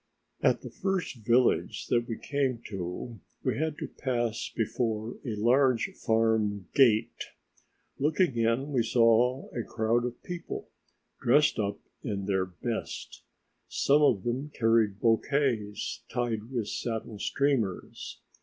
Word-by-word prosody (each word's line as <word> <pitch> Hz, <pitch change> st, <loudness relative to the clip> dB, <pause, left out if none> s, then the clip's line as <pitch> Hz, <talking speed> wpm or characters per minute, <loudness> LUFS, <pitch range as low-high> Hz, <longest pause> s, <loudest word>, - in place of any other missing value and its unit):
At -, -, +3 dB
the -, -, -8 dB
first 190 Hz, -8 st, -2 dB
village 120 Hz, +3 st, +2 dB
that 120 Hz, 0 st, +2 dB
we 115 Hz, -, -3 dB
came 135 Hz, -4 st, -1 dB
to 95 Hz, +4 st, -5 dB, 0.2 s
we -, -, 0 dB
had 155 Hz, -1 st, -1 dB
to -, -, -4 dB
pass 120 Hz, -4 st, -2 dB
before 110 Hz, 0 st, -2 dB
a 115 Hz, -6 st, -3 dB
large 125 Hz, +2 st, +3 dB
farm 110 Hz, -3 st, +1 dB
gate; 115 Hz, -6 st, +3 dB, 0.7 s
looking 155 Hz, 0 st, +2 dB
in 115 Hz, +5 st, +1 dB
we 130 Hz, -4 st, +2 dB
saw 120 Hz, +3 st, +3 dB
a 120 Hz, -, 0 dB
crowd 115 Hz, +2 st, 0 dB
of 120 Hz, 0 st, -6 dB
people 175 Hz, -2 st, -6 dB, 0.5 s
dressed 145 Hz, +2 st, +4 dB
up 100 Hz, -1 st, -1 dB, 0.3 s
in 100 Hz, -6 st, -3 dB
their 95 Hz, -2 st, +1 dB
best; 110 Hz, +6 st, -5 dB, 0.5 s
some 145 Hz, +2 st, +3 dB
of 110 Hz, -10 st, +4 dB
them 130 Hz, +5 st, -2 dB
carried 115 Hz, -6 st, +2 dB
bouquets 115 Hz, -3 st, 0 dB
tied 115 Hz, -2 st, -2 dB
with 120 Hz, -5 st, -2 dB
satin 110 Hz, -2 st, -4 dB
streamers. 130 Hz, -7 st, -1 dB
115 Hz, 125 wpm, -29 LUFS, 110-130 Hz, 0.7 s, dressed